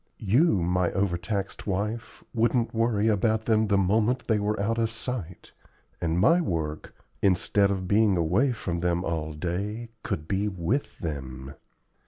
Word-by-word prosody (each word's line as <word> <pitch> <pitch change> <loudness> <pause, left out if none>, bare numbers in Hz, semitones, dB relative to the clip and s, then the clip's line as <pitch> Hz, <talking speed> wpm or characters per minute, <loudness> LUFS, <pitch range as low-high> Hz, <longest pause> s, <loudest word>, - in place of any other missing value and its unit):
You, 110 - +3
my 90 0 +1
overtaxed 100 +2 -2
wife, 110 +4 -3
wouldn't 115 +1 +1
worry 115 -2 +1
about 110 +1 +1
them 110 -1 +3
the 100 -1 +3
moment 110 +6 +2
they 110 -2 +2
were 105 +1 -1
out 115 +3 0
of 115 -1 +1
sight, 110 -6 -5 0.5
and 80 0 0
my 165 - +5
work, 80 - -3 0.3
instead 100 +1 +3
of 95 -2 -2
being 105 -1 +3
away 90 - +2
from 90 -7 -3
them 90 0 0
all 80 -2 -2
day, 100 +9 -3
could 100 -10 -4
be 100 +3 0
with 100 +8 -2
them. 65 -4 -5
100 Hz, 150 wpm, -27 LUFS, 85-110 Hz, 0.5 s, my